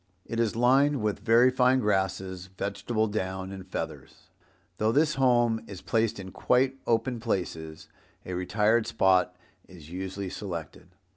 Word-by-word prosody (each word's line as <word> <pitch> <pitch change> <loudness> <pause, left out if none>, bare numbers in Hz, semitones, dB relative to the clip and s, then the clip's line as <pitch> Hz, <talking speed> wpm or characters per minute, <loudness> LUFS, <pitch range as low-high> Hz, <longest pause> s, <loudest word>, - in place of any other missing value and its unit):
It 115 - -4
is 115 -2 +1
lined 135 +2 +3
with 105 -2 -1
very 115 +4 +5
fine 130 0 +3
grasses, 95 -3 -1
vegetable 100 +3 -1
down 95 -3 -3
and 95 -1 -9
feathers. - - -7 0.5
Though 110 +1 +2
this 150 +4 +3
home 120 -4 +2
is 95 -2 -9
placed 110 +1 0
in 95 -1 -8
quite 130 +5 +1
open 115 +1 +1
places, 80 -8 -4 0.4
a 90 - -5
retired 105 +5 +1
spot 90 -1 +2 0.3
is 85 -4 -14
usually 95 +1 -5
selected. 85 -4 -7
105 Hz, 140 wpm, -27 LUFS, 95-120 Hz, 0.5 s, very